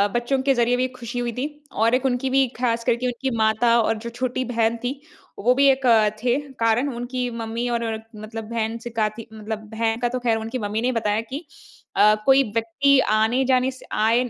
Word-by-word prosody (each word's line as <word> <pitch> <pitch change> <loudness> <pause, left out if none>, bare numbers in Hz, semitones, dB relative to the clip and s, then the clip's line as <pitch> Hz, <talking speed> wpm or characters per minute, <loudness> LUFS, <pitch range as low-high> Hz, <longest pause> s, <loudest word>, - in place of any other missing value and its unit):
बच्चों 240 +3 0
के 270 +1 +3
ज़रिए 240 -1 +2
भी 255 +1 +1
ख़ुशी 240 0 -5
हुई 240 -1 -1
थी। 250 +4 -2 0.3
और 225 +3 +3
एक 260 +1 -1
उनकी 260 0 0
भी 265 0 +3
ख़ास 235 -2 0
करके 240 +1 0
उनकी 250 +2 -2
माता 220 +2 +3
और 225 0 0
जो 235 +2 -6
छोटी 255 +1 -2
बहन 230 -1 0
थी 265 +3 -3 0.4
वो 245 +5 +3
भी 280 +1 +4
एक 265 0 -2 0.4
थे 245 0 +3 0.2
कारण। 230 +5 +2
उनकी 245 +1 -3
मम्मी 230 +2 -3
और 235 -1 -1 0.3
मतलब 215 +1 -7
बहन 225 -1 -2
सिखाती 225 -1 -3
मतलब 220 0 -5 0.2
बहन 225 0 0
का 245 - +1
तो 255 - -3
ख़ैर 235 -2 +1
उनकी 225 +3 -4
मम्मी 210 +1 -2
ने 250 +2 +1
बताया 215 -2 0
कि 270 +8 -7 0.5
अ, 210 +1 +6
कोई 270 0 +6
व्यक्ति 260 +5 +3 0.2
आने-जाने 255 +3 +2
से 260 - -14
आए 225 +2 +3
आने 250 0 -1
240 Hz, 200 wpm, -23 LUFS, 225-255 Hz, 0.5 s, अ